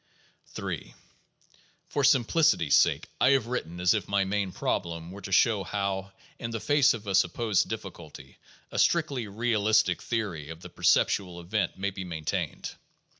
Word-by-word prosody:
Ill - - -3 1.1
For 145 - -1
simplicity's 130 - +3
sake, - - +3
I 130 - +6
have 135 -5 +2
written 100 -8 -4
as 90 +2 +4
if 105 -5 -2
my 100 -1 +1
main 100 -1 -1
problem 85 -1 -3
were 100 +2 -9
to 95 - -8
show 100 0 +3
how, 100 -1 -3 0.3
in 115 - -4
the 115 -1 -4
face 145 0 +3
of 110 -2 -9
a 100 - -2
supposed 95 +2 +2
difficulty, 65 - -9 0.3
a - - -3
strictly 140 -9 +1
realistic 110 0 +1
theory 100 -11 -3
of 80 +1 -9
the - - -9
perceptual 90 -3 +1
event 95 +5 -2
may 100 +1 -2
be 95 0 -6
maintained. 80 -4 -4
100 Hz, 155 wpm, -28 LUFS, 90-115 Hz, 1.1 s, I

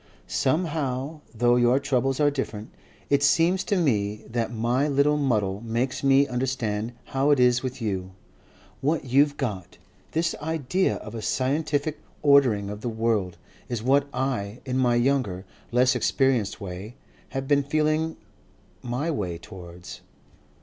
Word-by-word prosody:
Somehow 145 -1 -1
though 120 +2 +3
your 120 +1 +4
troubles 135 -1 0
are 145 -1 +4
different, 115 -6 -5 0.4
it 140 -1 +4
seems 170 +6 +3
to 200 - +1
me 105 - 0
that 115 0 -2
my 120 +5 +1
little 145 +1 +3
muddle 105 -8 0
makes 120 +4 -2
me 135 +1 +5
understand 120 -4 -2
how 135 +2 0
it 145 -3 +4
is 125 -1 +4
with 130 -1 -5
you. 95 -3 -2 0.7
What 145 +1 0
you've 140 +3 +3
got, 100 -10 -4 0.4
this 165 +1 +1
idea 160 +4 0
of 105 - -8
a 115 - -5
scientific 145 +4 -1 0.2
ordering 130 -9 +4
of 105 0 -7
the 120 - -2
world, 110 -5 -1 0.3
is 120 -3 -3
what 140 +3 +3
I, 125 -4 -2
in 130 0 -1
my 120 -2 +3
younger, 120 -7 +1 0.3
less 125 +1 +3
experienced 130 -8 +1
way, 100 +3 -7 0.3
have 135 0 -4
been 145 0 +4
feeling 155 +2 0 0.6
my 125 +7 -2
way 90 - -3
towards. 90 0 -11
130 Hz, 145 wpm, -25 LUFS, 110-145 Hz, 0.7 s, me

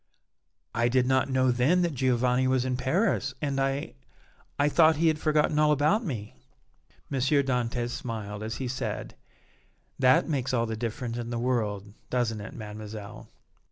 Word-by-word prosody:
"I 120 +1 +2
did 125 +1 +2
not 130 +1 +2
know 130 -1 +3
then 140 +10 +3
that 170 -2 0
Giovanni 125 0 +2
was 130 -1 +1
in 130 -1 0
Paris, 135 - 0
and 140 -2 -1
I 135 +1 -1 0.6
I 145 - +3
thought 160 +1 +5
he 165 +2 +3
had 155 -1 -1
forgotten 150 0 +2
all 150 0 +4
about 150 - +2
me." 115 - -5 0.8
M. 135 - -1
Dantès 125 -3 +1
smiled 110 -4 -5
as 110 +1 -4
he 130 - -4
said: 125 - -4 0.9
"That 130 -1 +4
makes 135 -5 -1
all 115 -1 +1
the 110 -1 -3
difference 115 +1 -4
in 120 0 -5
the 120 - -3
world, 105 -5 -1 0.2
doesn't 115 -4 -1
it, 105 - -9
Mademoiselle?" 105 -1 -8
125 Hz, 160 wpm, -27 LUFS, 115-140 Hz, 0.9 s, thought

